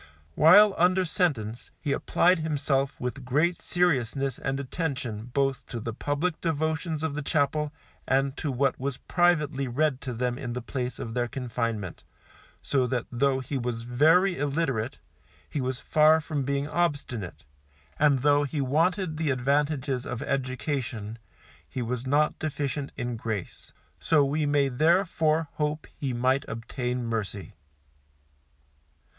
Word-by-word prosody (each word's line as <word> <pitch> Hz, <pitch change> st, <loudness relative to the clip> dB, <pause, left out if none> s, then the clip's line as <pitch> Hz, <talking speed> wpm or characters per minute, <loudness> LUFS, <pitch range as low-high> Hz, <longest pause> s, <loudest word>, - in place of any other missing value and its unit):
While 200 Hz, -, +7 dB
under 185 Hz, +2 st, +4 dB
sentence, 125 Hz, -, -1 dB
he 145 Hz, -, -2 dB
applied 175 Hz, +5 st, +3 dB
himself 140 Hz, -3 st, 0 dB
with 125 Hz, +2 st, -4 dB
great 150 Hz, +8 st, +1 dB
seriousness 135 Hz, -6 st, 0 dB
and 135 Hz, 0 st, -2 dB
attention 130 Hz, -6 st, -3 dB
both 135 Hz, +1 st, 0 dB
to 120 Hz, -, -5 dB
the 115 Hz, +1 st, -4 dB
public 145 Hz, +7 st, -2 dB
devotions 160 Hz, 0 st, -1 dB
of 160 Hz, -3 st, -1 dB
the 150 Hz, -, -3 dB
chapel 150 Hz, 0 st, 0 dB, 0.4 s
and 135 Hz, +1 st, +1 dB
to 150 Hz, -, -2 dB
what 135 Hz, +1 st, +1 dB
was 135 Hz, 0 st, -3 dB
privately 150 Hz, -6 st, +1 dB
read 135 Hz, +2 st, 0 dB
to 125 Hz, -1 st, -4 dB
them 125 Hz, +2 st, -2 dB
in 125 Hz, -4 st, -4 dB
the 125 Hz, -, -2 dB
place 125 Hz, -1 st, -3 dB
of 115 Hz, -, -5 dB
their 120 Hz, 0 st, 0 dB
confinement, 115 Hz, -7 st, -3 dB, 0.6 s
so 130 Hz, -3 st, +1 dB
that 125 Hz, -2 st, -1 dB
though 135 Hz, +2 st, +1 dB
he 135 Hz, +2 st, -3 dB
was 120 Hz, -2 st, -3 dB
very 160 Hz, +10 st, +3 dB
illiterate, 140 Hz, -5 st, -1 dB, 0.5 s
he 145 Hz, -, -3 dB
was 130 Hz, 0 st, -2 dB
far 155 Hz, +1 st, +5 dB
from 155 Hz, -2 st, -3 dB
being 140 Hz, +1 st, -1 dB
obstinate, 145 Hz, -, -2 dB, 0.6 s
and 140 Hz, -3 st, +3 dB
though 145 Hz, 0 st, +4 dB
he 145 Hz, +1 st, -3 dB
wanted 160 Hz, +5 st, +1 dB
the 160 Hz, -2 st, 0 dB
advantages 140 Hz, 0 st, 0 dB
of 120 Hz, -, -4 dB
education, 130 Hz, -5 st, -3 dB, 0.5 s
he 125 Hz, -, -3 dB
was 125 Hz, +2 st, -3 dB
not 150 Hz, +3 st, +2 dB
deficient 145 Hz, -2 st, -3 dB
in 125 Hz, -2 st, -3 dB
grace, 110 Hz, -5 st, -5 dB, 0.3 s
so 155 Hz, -3 st, +3 dB
we 150 Hz, +2 st, 0 dB
may 145 Hz, -1 st, +3 dB
therefore 160 Hz, +2 st, +2 dB
hope 150 Hz, 0 st, -1 dB
he 135 Hz, -3 st, -3 dB
might 130 Hz, +3 st, +1 dB
obtain 125 Hz, +1 st, -3 dB
mercy. 105 Hz, -2 st, -4 dB
140 Hz, 140 wpm, -27 LUFS, 125-155 Hz, 0.6 s, While